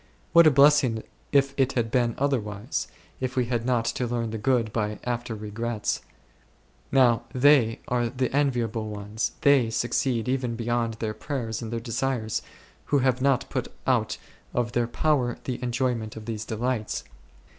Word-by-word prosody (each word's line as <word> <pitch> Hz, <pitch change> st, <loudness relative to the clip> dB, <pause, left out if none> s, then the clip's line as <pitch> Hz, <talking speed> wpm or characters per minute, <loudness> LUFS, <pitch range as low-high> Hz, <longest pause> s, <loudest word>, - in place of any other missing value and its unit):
What 170 Hz, -1 st, +8 dB
a -, -, +9 dB
blessing 140 Hz, -5 st, +4 dB, 0.3 s
if 140 Hz, -1 st, +3 dB
it 135 Hz, -1 st, +2 dB
had 115 Hz, -3 st, 0 dB
been 120 Hz, -2 st, +2 dB
otherwise, 120 Hz, -4 st, -1 dB, 0.3 s
if 130 Hz, -1 st, -3 dB
we 125 Hz, -2 st, +2 dB
had 120 Hz, 0 st, -2 dB
not 120 Hz, -3 st, +2 dB
to 120 Hz, +1 st, -1 dB
learn 115 Hz, -1 st, -2 dB
the 110 Hz, -, -4 dB
good 115 Hz, -1 st, +1 dB
by 105 Hz, -1 st, -1 dB
after 120 Hz, -2 st, -3 dB
regrets! 110 Hz, +1 st, -3 dB, 0.9 s
Now 125 Hz, -4 st, +4 dB
they 130 Hz, -4 st, +4 dB
are 120 Hz, -1 st, +1 dB
the 130 Hz, +1 st, -2 dB
enviable 120 Hz, -6 st, 0 dB
ones, 105 Hz, +2 st, -3 dB
they 140 Hz, -5 st, +5 dB
succeed 120 Hz, +1 st, 0 dB
even 125 Hz, -2 st, -1 dB
beyond 115 Hz, -1 st, -1 dB
their 110 Hz, -1 st, -3 dB
prayers 115 Hz, -4 st, -4 dB
and 115 Hz, -1 st, -5 dB
their 115 Hz, -, -2 dB
desires, 115 Hz, -1 st, -2 dB, 0.4 s
who 145 Hz, -, +2 dB
have 130 Hz, -1 st, +2 dB
not 135 Hz, -1 st, +2 dB
put -, -, -2 dB, 0.2 s
out -, -, +1 dB, 0.4 s
of 120 Hz, -1 st, 0 dB
their 120 Hz, -1 st, +1 dB
power 125 Hz, -2 st, +1 dB
the 125 Hz, -2 st, -4 dB
enjoyment 120 Hz, -3 st, -1 dB
of 110 Hz, -1 st, -8 dB
these 110 Hz, -1 st, -4 dB
delights. 115 Hz, 0 st, -2 dB
120 Hz, 160 wpm, -26 LUFS, 115-130 Hz, 0.9 s, a